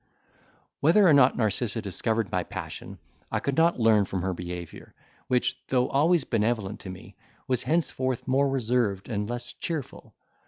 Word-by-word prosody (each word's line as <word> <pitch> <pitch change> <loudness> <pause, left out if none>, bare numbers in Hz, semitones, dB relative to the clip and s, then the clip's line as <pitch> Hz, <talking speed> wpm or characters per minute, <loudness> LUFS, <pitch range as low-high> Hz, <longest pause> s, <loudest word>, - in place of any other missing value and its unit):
Whether 175 +7 +5
or 160 - +6
not 140 -2 +5
Narcissa 110 +1 0
discovered 110 +1 -2
my - - 0
passion, - - -7 0.3
I - - 0
could 140 - -2
not 165 -1 +3
learn 110 -3 +4
from 95 -2 -3
her 95 0 -1
behaviour, 90 -1 -8 0.3
which, 125 -1 0
though 125 -1 +1
always 160 +3 +3
benevolent 110 -3 -1
to 95 - -9
me 95 -1 -10 0.3
was 125 -2 +1
henceforth 130 -6 -1
more 135 +2 +2
reserved 120 -6 0
and 105 -2 -2
less 120 0 -3
cheerful. 160 -6 -6
120 Hz, 155 wpm, -27 LUFS, 105-135 Hz, 0.3 s, or